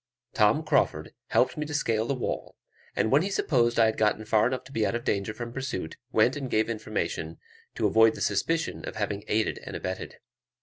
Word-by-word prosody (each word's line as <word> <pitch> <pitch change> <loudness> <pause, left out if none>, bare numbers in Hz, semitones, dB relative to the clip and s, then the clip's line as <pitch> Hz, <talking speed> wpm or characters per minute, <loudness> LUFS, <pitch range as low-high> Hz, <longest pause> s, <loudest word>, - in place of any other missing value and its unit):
Tom 110 +8 +3
Crauford 140 - +1
helped - - +2
me 150 - -2
to 150 - -4
scale 115 -6 +1
the 140 - 0
wall; 125 - -4 0.4
and 110 - +1
when 140 +3 +5
he 190 - -1
supposed 120 -11 +2
I 115 - +7
had 110 0 0
got 110 0 +1
far 110 0 +4
enough 130 0 -3
to 130 - -14
be 110 -4 0
out 115 - 0
of 120 - -3
danger 100 +1 0
from 120 +1 -7
pursuit, 130 -11 -4 0.2
went 115 +4 +3
and 135 -3 -4
gave 110 0 +1
information, 105 -7 -3 0.4
to - - 0
avoid 110 0 +5
the - - -8
suspicion 160 +12 0
of - - -6
having 105 -1 -2
aided 110 +1 0
and - - -7
abetted. 95 0 -5
115 Hz, 210 wpm, -27 LUFS, 105-130 Hz, 0.4 s, I